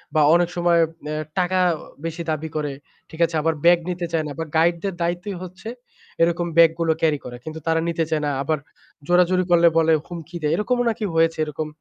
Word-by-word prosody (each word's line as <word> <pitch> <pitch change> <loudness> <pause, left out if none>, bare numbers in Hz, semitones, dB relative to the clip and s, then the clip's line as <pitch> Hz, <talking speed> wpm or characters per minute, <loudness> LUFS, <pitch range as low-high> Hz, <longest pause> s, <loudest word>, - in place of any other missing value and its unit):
বা 155 - +5
অনেক 175 0 +2
সময় 175 -1 +3 0.3
অ্যা 155 - -3 0.2
টাকা 185 +1 +1 0.5
বেশি 165 +1 -4
দাবি 155 +1 -3
করে, 150 -2 -1 0.4
ঠিক 160 - -12
আছে? 165 -1 -5
আবার 165 +1 +1
ব্যাগ 175 0 +6
নিতে 175 -1 -3
চায় 165 -2 0
না। 150 - -5
আবার 160 -1 -5
গাইডদের 170 +3 +1
দায়িত্বই 175 +3 -2
হচ্ছে 185 +5 -9 0.5
এরকম 170 +1 +2
ব্যাগ 165 -1 +7
গুলো 165 -1 +2
ক্যারি 155 -3 +2
করা, 120 -1 -7
কিন্তু 160 0 -7
তারা 165 0 +2
নিতে 165 -1 0
চায় 155 -1 0
না। 145 - 0
আবার 155 0 0 0.5
জোরাজুরি 180 +1 +3
করলে 170 0 +6
বলে 160 0 +4
হুমকি 170 0 -8
দেয়। 150 0 0
এরকমও 245 +5 0
নাকি 220 -1 -2
হয়েছে 165 0 +3
এরকম। 155 +1 -4
165 Hz, 200 wpm, -22 LUFS, 160-175 Hz, 0.5 s, ব্যাগ